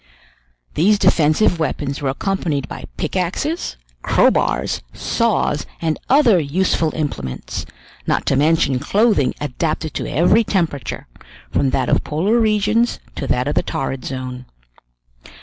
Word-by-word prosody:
These 205 +6 +3
defensive 165 +1 +3
weapons 145 -3 -2
were 140 - 0
accompanied 150 -2 -2
by - - -8
pickaxes, 190 - -2 0.3
crowbars, - - +2
saws, 230 -9 0
and 160 -2 -1
other 250 -9 +5
useful 165 +1 +1
implements, 70 - -4 0.4
not - - +1
to - - +2
mention 145 -2 +2
clothing 195 - +2
adapted 155 +2 -2
to - - -3
every 180 +8 +4
temperature, 165 - -2 0.5
from 135 - +2
that 130 -1 0
of - - +2
polar 195 +10 +1
regions 215 +2 +2
to 135 - -5
that 125 +1 0
of 145 - 0
the - - +2
torrid 135 -1 -3
zone. 130 -1 -6
160 Hz, 125 wpm, -19 LUFS, 140-200 Hz, 0.5 s, other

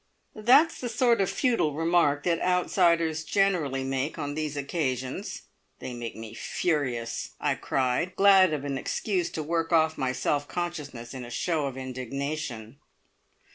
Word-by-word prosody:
"That's 255 +9 +4
the 245 - -3
sort 235 -1 +3
of 190 - +1
futile 230 - +1
remark 165 -3 +2
that 170 -2 +1
outsiders 170 -3 +2
generally 165 -10 +1
make 135 +3 -2
on 145 0 -3
these 150 -1 -3
occasions. 135 -3 -3 0.3
They 125 - -6
make 120 -1 -6
me 110 -1 -8
furious!" 125 -9 -2
I - - +1
cried, 130 +7 -1
glad 195 -2 +6
of 145 -2 -3
an 140 -2 -2
excuse 185 +1 -1
to 155 - -4
work 165 +2 -1
off 160 -2 +3
my 130 -2 0
self 145 +2 -1
consciousness 150 -9 -5
in 130 -1 -6
a 120 - -8
show 155 +3 -1
of 135 -1 -6
indignation. 130 -1 -5
150 Hz, 150 wpm, -27 LUFS, 130-175 Hz, 0.3 s, glad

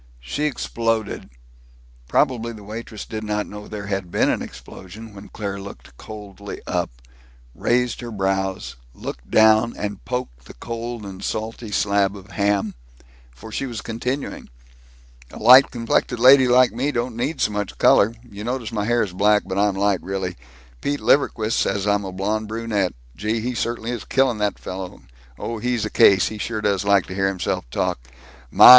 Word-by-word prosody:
She 65 - -2
exploded. 115 -6 -1 0.8
Probably 115 -2 +1
the 105 -2 -11
waitress 110 0 -7
did 110 -1 -5
not 105 0 -1
know 105 0 -9
there 105 -2 -6
had 95 -3 -3
been - - +2
an - - -1
explosion 105 +4 -10
when 100 0 -11
Claire 100 -2 -4
looked 100 -10 -11
coldly 100 - -9
up, - - -1 0.6
raised 125 - +1
her 120 - -6
brows, 95 -2 -1 0.2
looked - - -7
down, 110 +1 +5
and 105 -1 -4
poked 65 - -4
the - - -12
cold 115 - -5
and 95 -1 -8
salty 110 +1 -4
slab 100 0 +2
of 100 +2 -13
ham, 100 0 +1 0.6
for 65 - -12
she 135 - -2
was 115 -5 -5
continuing: 125 +5 -4 0.8
"A - - -10
light 125 +5 +8
complected 120 0 0
lady 130 +1 +8
like 125 -1 +5
me 130 +5 0
don't 120 -2 -2
need 135 +5 -2
so - - +2
much 105 -1 -3
color, 110 +3 +5
you 105 -2 -8
notice 120 -1 -3
my 105 -2 -1
hair 120 +1 +3
is 95 -4 -5
black, 105 +2 +4
but 95 0 -2
I'm 100 -1 +2
light, 100 -1 +2
really, 95 -1 -3 0.5
Pete 145 0 -1
Liverquist 115 -6 +2
says 100 0 0
I'm 100 -1 +2
a 95 - -5
blonde 105 +4 -1
brunette, 110 -4 -1 0.2
gee, 110 +2 -1
he 125 +3 -2
certainly 120 0 -2
is 120 -3 -4
killing 130 -4 +2
that 105 -1 0
fellow, 95 -1 -7 0.3
oh, 115 - -4
he's 120 -1 0
a 110 - -4
case, 95 -2 +6
he 110 - -7
sure 110 +1 -2
does 100 -2 +1
like 100 -1 +4
to - - -7
hear 95 0 +1
himself 90 -10 -2
talk, - - -1 0.5
my! - - +9
105 Hz, 175 wpm, -22 LUFS, 100-115 Hz, 0.8 s, my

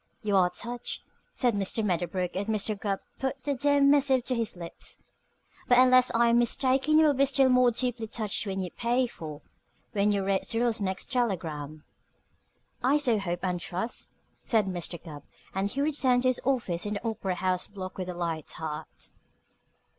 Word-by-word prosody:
"You 205 -1 +1
are 180 -2 +5
touched," 240 +6 -5 0.3
said 245 -3 +2
Mr. 205 +2 0
Medderbrook 180 -1 -1
as 200 +2 -2
Mr. 215 0 0
Gubb 200 -1 -3 0.2
put 265 -1 -3
the 285 - 0
dear 285 +2 +2
missive 280 -2 +4
to 255 - -1
his 230 -4 -1
lips, 170 -1 -7 0.6
"but 245 0 +5
unless 255 0 +6
I 235 0 +4
am 235 +1 +4
mistaken 265 +5 +2
you 315 - +6
will 295 - +4
be 275 +1 +3
still 270 -1 +4
more 250 -1 +5
deeply 240 -1 -2
touched 215 -1 -1
when 190 -1 -2
you 180 - -5
pay 245 +2 +1
for 155 -10 -8 0.5
when 205 0 +2
you 200 -1 0
read 195 -1 +1
Syrilla's 230 -1 +1
next 190 +3 -2
telegram." 160 - -2 1.0
"I 270 +4 +4
so 245 -7 +2
hope 175 -3 -3
and 180 -1 -1
trust," 185 +7 -4 0.3
said 220 -4 +2
Mr. 175 -2 -4
Gubb, 150 -4 -9 0.3
and 195 +1 -1
he 275 - -2
returned 270 -4 +2
to 255 - +4
his 255 - 0
office 225 -9 -1
in 205 - -2
the 205 - -4
Opera 195 -4 -2
House 185 0 -1
Block 190 -2 -8
with 185 -1 -4
a 180 - -5
light 165 -3 -3
heart. 155 -2 -7
215 Hz, 185 wpm, -28 LUFS, 185-250 Hz, 1.0 s, unless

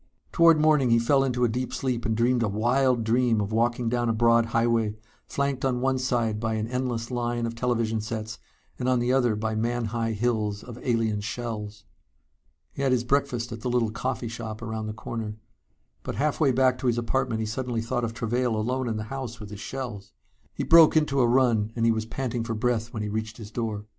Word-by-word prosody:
Toward 165 -2 +6
morning 150 -4 +4
he 115 - +5
fell 135 +4 +3
into 125 -2 0
a - - +5
deep 125 +3 -3
sleep 125 -3 -2
and 110 -1 0
dreamed 120 +1 +2
a 115 - +2
wild 120 +4 +2
dream 115 0 +2
of 100 0 -2
walking 120 +2 +1
down 120 0 0
a - - +2
broad 115 0 +4
highway, 115 -2 +1 0.3
flanked 140 -2 -1
on 130 -2 +1
one 130 +1 +1
side 120 -4 0
by 110 0 -1
an 110 0 -2
endless 125 -1 -3
line 120 -1 -1
of 115 - -3
television 115 -2 0
sets 110 0 -5 0.4
and 125 - 0
on 130 - +3
the 120 +1 +1
other 125 -4 +3
by 110 +1 -2
man 120 +2 -1
high 115 -1 -1
hills 105 -2 -1
of 120 -1 -9
alien 115 -4 0
shells. 105 -1 -5 0.9
He - - -6
had 135 -1 +2
his 120 -2 +1
breakfast 125 -2 0
at 115 0 -6
the 125 - -2
little 120 -3 +1
coffee 120 +1 -3
shop 115 -1 -6
around 110 -1 -4
the 110 - -4
corner. 110 -1 -5 0.7
But - - -5
halfway 150 -1 +2
back 130 0 +2
to 130 - -2
his 120 -1 +2
apartment 120 0 0
he 110 - -1
suddenly 120 0 -3
thought 120 +1 -2
of 115 0 -3
Travail 120 0 0
alone 125 +3 -1
in 110 - -2
the 110 - -3
house 130 -4 -5
with 105 -2 -9
his 105 - -8
shells. 120 -5 -6 0.4
He - - -2
broke 165 -1 +7
into 140 -3 +2
a 120 - +4
run 120 -4 +2
and 115 -1 +1
he 115 - +5
was 110 0 -2
panting 125 -1 -3
for 115 0 -3
breath 115 0 -1
when 110 -4 -4
he 105 - -3
reached 110 +1 -4
his 110 -3 -9
door. 110 -3 -3
115 Hz, 220 wpm, -26 LUFS, 110-125 Hz, 0.9 s, broke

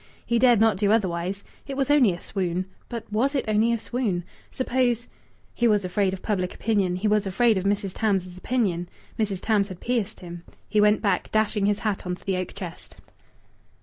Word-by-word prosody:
He 235 0 +1
dared 240 -3 +5
not 220 -3 +4
do 205 +1 +2
otherwise.... 190 -2 0 0.2
It 275 -1 -5
was 275 0 +1
only 270 -9 +5
a 175 - -5
swoon. 185 -2 -2 0.2
But 235 -2 -4
was 265 +7 +1
it 270 - 0
only 215 +2 +3
a 235 - +1
swoon? 220 -7 -2 0.3
Suppose...! 250 -2 0 0.5
He 240 - +2
was 210 -3 +2
afraid 190 +1 +1
of 190 -1 -7
public 185 -4 -1
opinion; 200 -5 +1
he 190 +4 -1
was 210 -1 +2
afraid 220 +4 +3
of 190 0 -2
Mrs. 200 -1 0
Tams's 190 -5 0
opinion. 185 -4 -1 0.3
Mrs. 200 -4 -1
Tams 210 -3 +2
had 185 -3 -9
pierced 230 -4 -2
him. 175 -1 -8 0.3
He 210 0 +2
went 210 +1 +4
back, 195 -4 +1
dashing 215 -2 +1
his 205 -1 +2
hat 200 -3 -1
on 180 - -1
to - - -20
the 195 -2 0
oak 185 -1 -4
chest. 180 -4 -8
205 Hz, 200 wpm, -25 LUFS, 185-230 Hz, 0.5 s, dared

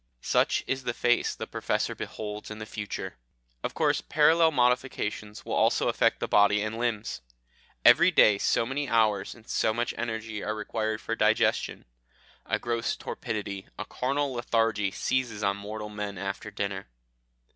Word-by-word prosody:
Such - - +2
is 135 0 -2
the 120 -1 -2
face 120 0 +2
the - - -5
Professor - - -1
beholds 105 -1 -6
in 110 - -7
the 110 - -6
future. 105 -6 -5 0.5
Of - - -3
course - - +2
parallel 160 +2 +4
modifications 125 -6 -1
will - - -4
also - - +3
affect - - +2
the - - -2
body 105 0 +4
and 110 +1 -4
limbs. 115 - -2 0.6
"Every - - +8
day 105 -2 +5
so 115 - +2
many 135 +2 -2
hours 110 -4 +2
and 115 -2 -18
so 110 - +1
much 120 +1 -1
energy 110 -2 -3
are 110 - -2
required 110 0 -2
for 115 - -2
digestion; 110 0 +1 0.6
a - - +1
gross 115 -1 -1
torpidity, 100 -4 -5
a 105 - -4
carnal 140 +3 -1
lethargy, 115 -4 +1
seizes 115 0 -1
on 100 0 +1
mortal 105 +1 -6
men 105 -1 -5
after 100 +2 -4
dinner. 100 -5 -4
110 Hz, 155 wpm, -28 LUFS, 105-120 Hz, 0.6 s, Every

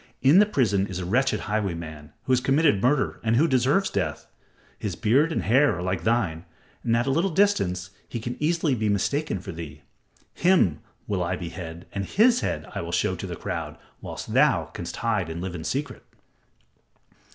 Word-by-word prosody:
In 145 +8 +7
the 210 - +5
prison 105 - +1
is 95 - -5
a 90 - -4
wretched 120 +3 +1
highwayman 85 -8 -4
who 130 - -3
has 130 - +5
committed 135 -5 +3
murder 130 +3 +1
and 115 0 +2
who 150 +7 +4
deserves 135 +8 +2
death. 80 -6 -2 0.5
His - - -3
beard 140 +9 +2
and - - -1
hair 130 +7 +3
are 90 - -4
like 90 -2 -2
thine, 100 -8 0 0.4
and 115 0 +2
at 120 - +1
a 135 - +1
little 170 +8 +2
distance 100 - +1 0.2
he 120 - -4
can 120 +2 -4
easily 160 -1 +1
be 110 -3 0
mistaken 120 +5 0
for 95 +1 -7
thee. 80 -4 -9 0.5
Him 170 - +3 0.3
will 95 -3 -1
I 85 - -1
behead 85 -1 -7
and 100 - -2
his 230 - +4
head - - -2
will - - -3
I - - -6
show - - 0
to - - -6
the - - -5
crowd, - - -5 0.2
whilst - - -7
thou - - +3
canst 85 0 -6
hide 105 -7 -1
and 80 +1 -5
live 90 0 -4
in 80 -3 -6
secret." 135 - -3
110 Hz, 190 wpm, -25 LUFS, 90-140 Hz, 0.5 s, In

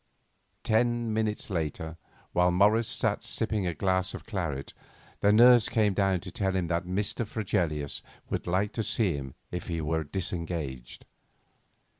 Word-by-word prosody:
Ten 120 0 +1
minutes 110 -2 -1
later, 80 -1 -3 0.4
while 90 0 +4
Morris 105 +5 +4
sat - - 0
sipping 105 -4 -1
a 85 - -2
glass 95 +2 0
of - - -9
claret, 85 -11 -3 0.5
the 100 - +4
nurse 120 +1 +7
came 105 -3 +2
down 95 -2 +1
to 95 - -8
tell 95 +1 -1
him 95 -2 +1
that 85 +1 0
Mr. 100 +6 -1
Fregelius 85 -9 -2 0.3
would - - -3
like 95 +4 +1
to 115 - -1
see 105 -4 +1
him 65 -2 -6 0.2
if 90 - -4
he 85 -2 -2
were 80 +1 0
disengaged. 80 -6 -4
95 Hz, 150 wpm, -29 LUFS, 85-105 Hz, 0.5 s, nurse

